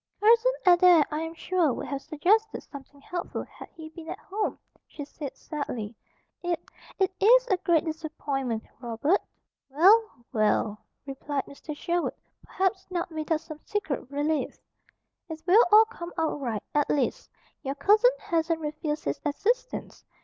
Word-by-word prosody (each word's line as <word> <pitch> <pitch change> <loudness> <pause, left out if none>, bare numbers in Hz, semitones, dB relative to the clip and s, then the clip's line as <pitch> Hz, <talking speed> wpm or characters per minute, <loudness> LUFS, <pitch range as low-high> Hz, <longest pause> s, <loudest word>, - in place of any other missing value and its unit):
"Cousin 460 +4 +5
Adair, 350 -3 +7
I 300 +1 -2
am 325 0 -5
sure, 345 -3 +1
would - - -5
have 275 -1 -4
suggested 425 +11 +1
something 280 0 -12
helpful 350 +4 -4
had - - -13
he 315 -1 -11
been 320 0 -10
at - - -4
home," 415 +2 -3 0.3
she 290 - -8
said 285 -1 -8
sadly. 240 -8 -5 0.5
"It, 350 -1 -1 0.4
it 380 -2 +2
is - - +6
a 380 - +3
great 340 -2 +2
disappointment, 285 -7 -3 0.2
Robert." 245 - +1 0.5
"Well, 370 - +4
well!" 215 -1 +1 0.3
replied 275 0 -3
Mr. 295 +1 -9
Sherwood, 345 +2 -1 0.3
perhaps 380 0 -1
not 350 -1 -3
without 315 0 -1
some 310 -2 -10
secret 315 - -3
relief. 290 -1 -1 0.7
"It 320 0 -7
will 400 +6 +7
all 435 +1 +9
come 350 -6 -9
out 320 -3 -1
right. 225 -6 -3
At 295 -1 +2
least, 275 -4 0 0.3
your 275 -1 -3
cousin 420 - +5
hasn't 330 -1 0
refused 305 0 -3
his - - -3
assistance. 470 +12 -2
320 Hz, 150 wpm, -27 LUFS, 285-370 Hz, 0.7 s, all